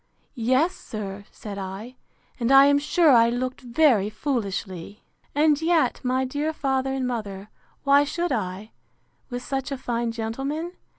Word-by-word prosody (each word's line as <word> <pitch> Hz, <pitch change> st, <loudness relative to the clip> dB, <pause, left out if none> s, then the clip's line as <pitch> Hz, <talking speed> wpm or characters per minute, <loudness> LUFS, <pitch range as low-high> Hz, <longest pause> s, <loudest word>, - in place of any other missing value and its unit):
—Yes, 260 Hz, +8 st, +2 dB
sir, 205 Hz, -2 st, -7 dB
said 200 Hz, -2 st, -8 dB
I 195 Hz, +6 st, -7 dB, 0.4 s
and 235 Hz, +1 st, +1 dB
I 275 Hz, 0 st, +9 dB
am 285 Hz, 0 st, +4 dB
sure 305 Hz, +2 st, +3 dB
I 230 Hz, -2 st, +6 dB
looked 255 Hz, +3 st, -3 dB
very 240 Hz, -5 st, +3 dB
foolishly! 205 Hz, -, -4 dB, 0.3 s
And 300 Hz, 0 st, +3 dB
yet, 320 Hz, -7 st, +2 dB
my 260 Hz, +1 st, +1 dB
dear 290 Hz, +4 st, -2 dB
father 265 Hz, -2 st, 0 dB
and 265 Hz, -1 st, -1 dB
mother, 210 Hz, -5 st, -4 dB, 0.3 s
why 280 Hz, 0 st, +5 dB
should 340 Hz, +3 st, -2 dB
I, 205 Hz, -2 st, -3 dB, 0.6 s
with 245 Hz, -1 st, -5 dB
such 270 Hz, 0 st, -3 dB
a 275 Hz, -, -2 dB
fine 235 Hz, -2 st, -2 dB
gentleman? 270 Hz, +9 st, -3 dB
255 Hz, 145 wpm, -25 LUFS, 220-285 Hz, 0.6 s, I